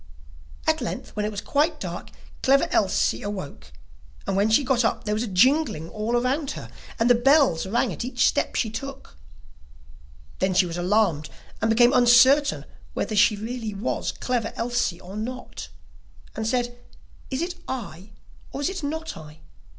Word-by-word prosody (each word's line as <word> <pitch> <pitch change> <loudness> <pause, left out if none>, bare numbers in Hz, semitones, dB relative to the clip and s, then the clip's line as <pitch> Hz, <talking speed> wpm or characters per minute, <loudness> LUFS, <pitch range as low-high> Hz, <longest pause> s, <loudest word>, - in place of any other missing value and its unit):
At - - +1
length, - - -5
when 210 - -1
it - - -1
was 205 -1 -5
quite 290 +9 0
dark, - - -6 0.3
Clever 275 +1 +4
Elsie 195 -3 +1
awoke 145 - -7 0.5
and 195 - -1
when 200 +3 +2
she 220 +6 +4
got 250 -2 +2
up 225 - 0
there 210 - -1
was 215 - -1
a 240 - -2
jingling 210 - +2
all 215 +2 -3
round 240 +1 +2
about 275 +3 0
her, - - -9 0.3
and 230 - +2
the 245 - +7
bells 255 - +3
rang 235 +5 0
at - - -5
each 245 -1 +1
step - - 0
which - - -2
she 220 - 0
took. 275 - -8 1.2
Then 190 -1 +1
she 185 - +5
was 170 -1 -5
alarmed, 175 -5 +1 0.3
and 225 - +1
became 240 +2 +5
uncertain 255 +4 +5 0.3
whether 215 - -2
she 210 +1 +5
really 220 0 -5
was 205 +5 -2
Clever 245 -3 -2
Elsie 235 -7 -1
or 185 +2 -10
not, 250 +4 -6 0.7
and 220 0 -3
said: 245 0 -1 0.5
'Is 265 +4 -2
it 350 +1 -3
I, 205 -7 -6 0.4
or 275 - -5
is 290 - +1
it 380 -1 -5
not 320 +2 -4
I? 155 -1 -12
230 Hz, 175 wpm, -24 LUFS, 200-260 Hz, 1.2 s, the